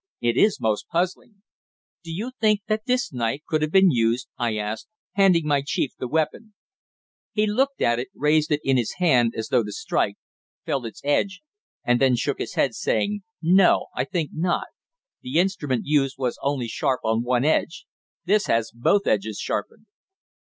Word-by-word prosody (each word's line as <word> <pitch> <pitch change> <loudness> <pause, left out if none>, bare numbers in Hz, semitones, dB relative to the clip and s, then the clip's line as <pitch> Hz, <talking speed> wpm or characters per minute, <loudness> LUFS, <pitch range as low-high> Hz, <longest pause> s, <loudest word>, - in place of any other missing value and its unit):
"It 120 0 +1
is 210 - +3
most 110 -3 -1
puzzling." 185 +4 -3 0.6
"Do 165 - -8
you 215 +10 -4
think 215 -2 +3
that 215 +1 -2
this 250 - 0
knife 120 +3 -1
could 155 -2 0
have 155 - 0
been 190 +1 +5
used?" 120 0 0
I 115 -3 -1
asked, 105 +1 -4 0.2
handing 185 -5 +3
my 145 -2 +2
chief 140 -1 -1
the 125 - -3
weapon. 160 - -2 0.8
He 215 -1 +2
looked 265 +6 0
at 120 0 +2
it, 125 - -4
raised 150 +1 +2
it 150 0 +1
in 135 -1 +2
his 120 -3 -1
hand 125 -10 +3
as 110 - -4
though 115 - +3
to 105 - -6
strike, - - -1 0.5
felt 130 -4 -2
its 110 - -11
edge, 185 - 0 0.4
and 120 +1 +2
then 130 -2 +4
shook 135 +3 -2
his - - -5
head, 130 - +2
saying: 205 - -1 0.2
"No, 180 +3 +4
I 125 - 0
think 160 0 -3
not. 175 +2 -1 0.5
The 130 +5 -3
instrument 170 -9 0
used 140 -2 +1
was 125 -2 -2
only 140 -4 -1
sharp 130 +3 -1
on 110 +1 +1
one 125 +2 +1
edge. 160 +2 0 0.4
This 205 +3 +2
has 115 -1 +1
both 200 - +2
edges 105 0 0
sharpened." 215 - -4
145 Hz, 180 wpm, -24 LUFS, 120-185 Hz, 0.8 s, been